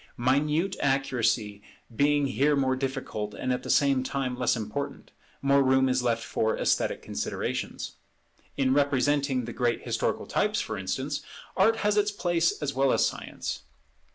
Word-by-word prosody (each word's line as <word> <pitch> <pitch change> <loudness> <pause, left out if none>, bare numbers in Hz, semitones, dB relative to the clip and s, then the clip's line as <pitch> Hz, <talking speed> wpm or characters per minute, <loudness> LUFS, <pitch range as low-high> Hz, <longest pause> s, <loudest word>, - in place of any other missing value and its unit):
Minute 150 +9 +1
accuracy 125 -6 0 0.3
being 145 +2 +3
here 140 +2 +2
more 130 -2 +1
difficult 130 -6 -4
and 130 0 -1
at 125 - -2
the - - -8
same 140 -2 +3
time 130 -1 -2
less 125 0 +1
important, 115 +5 -5 0.3
more 140 0 +4
room 130 0 +4
is 130 0 +1
left 115 -2 0
for 110 0 0
esthetic - - 0
considerations. - - -4 0.6
In 130 -1 +2
representing 140 -2 +2
the 120 - -6
great 120 -2 0
historical - - -1
types, - - 0
for - - -3
instance, 130 +11 -3 0.3
Art 220 +4 +4
has 210 0 +3
its 205 0 +3
place 175 -4 0
as 140 -1 -1
well 135 0 +2
as - - +3
Science. - - -4
135 Hz, 155 wpm, -27 LUFS, 125-145 Hz, 0.6 s, more